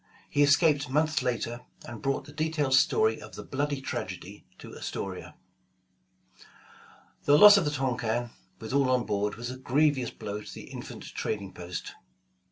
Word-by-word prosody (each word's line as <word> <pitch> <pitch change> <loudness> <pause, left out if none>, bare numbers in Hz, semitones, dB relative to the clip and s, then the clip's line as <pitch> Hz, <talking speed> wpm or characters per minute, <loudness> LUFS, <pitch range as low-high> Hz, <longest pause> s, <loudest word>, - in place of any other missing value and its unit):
He 145 - +2
escaped 145 -1 +4
months 155 +2 +1
later, 120 -1 -2 0.2
and 120 -3 -8
brought 135 0 -1
the 145 - -12
detailed 155 -3 0
story 440 - +3
of - - -11
the - - -7
bloody 145 +1 -2
tragedy 95 -6 -6
to - - -11
Astoria. 90 -3 -6 1.9
The 145 0 +6
loss 205 +4 +10
of 195 -5 +3
the - - +1
Tonquin, 120 -4 -1 0.3
with 110 +2 -6
all 140 -2 +3
on 125 -1 +2
board, 105 0 -1
was 120 +2 -5
a 130 - -7
grevious 135 0 +1
blow 105 0 -6
to - - -10
the - - -10
infant - - -8
trading 100 -3 -3
post. 90 0 -6
130 Hz, 160 wpm, -28 LUFS, 110-145 Hz, 1.9 s, loss